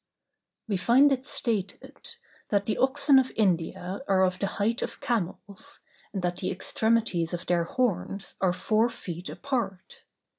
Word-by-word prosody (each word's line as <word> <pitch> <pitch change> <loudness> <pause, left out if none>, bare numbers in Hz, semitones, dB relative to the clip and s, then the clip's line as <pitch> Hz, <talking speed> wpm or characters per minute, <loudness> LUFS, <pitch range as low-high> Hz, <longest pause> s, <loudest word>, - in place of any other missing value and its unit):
We 205 -3 0
find 255 +9 +5
it 260 -1 0
stated, 210 -7 -2 0.3
that 200 -1 +1
the 215 - -1
oxen 275 +1 +5
of 260 -1 0
India 185 0 0
are 190 -1 +4
of 185 0 +1
the 200 - 0
height 220 +3 +1
of - - -4
camels, 200 -3 -3 0.3
and 195 -3 -4
that 175 0 -1
the - - -2
extremities 195 -4 +1
of 175 - -7
their 170 -1 +2
horns 200 -2 -1
are 190 -2 +4
four 215 +5 +2
feet 175 -4 -6
apart. 225 -9 -4
200 Hz, 150 wpm, -27 LUFS, 180-235 Hz, 0.3 s, find